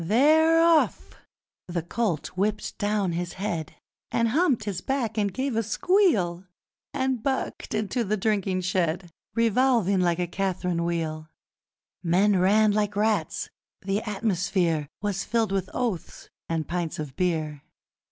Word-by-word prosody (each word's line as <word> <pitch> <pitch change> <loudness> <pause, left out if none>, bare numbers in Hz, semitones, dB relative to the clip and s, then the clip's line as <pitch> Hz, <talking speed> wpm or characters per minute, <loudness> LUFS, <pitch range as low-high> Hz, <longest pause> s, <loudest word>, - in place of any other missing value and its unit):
They're 310 - +5
off! 330 -2 +3 0.5
The 175 -2 -3
colt 180 -3 -2
whipped 205 +3 -2
down 205 -3 0
his 175 +1 -3
head, 185 -6 -4 0.3
And 230 0 +1
humped 280 -3 +2
his 195 -4 -3
back 245 -4 -1
and 205 -2 0
gave 260 +4 -2
a 225 - +2
squeal, 210 - +2 0.4
And 265 -4 -1
bucked 265 -3 -2
into 215 +3 -1
the 215 0 -1
drinking 195 -3 0
shed, 175 -1 -1 0.2
Revolving 230 -4 +3
like 175 -2 +2
a 180 - 0
Cath'rine 180 -1 -1
wheel! 155 -2 -3 0.7
Men 185 +3 +3
ran 210 +3 +4
like 205 0 0
rats! 210 -6 0 0.3
The 195 +2 0
atmosphere 185 -7 0 0.2
Was 200 -2 -1
filled 225 -3 0
with 195 -1 -1
oaths 230 -10 -4 0.2
and 160 -2 -1
pints 170 -2 -3
of 150 -4 -6
beer! 155 -5 -1
200 Hz, 135 wpm, -26 LUFS, 175-225 Hz, 0.7 s, They're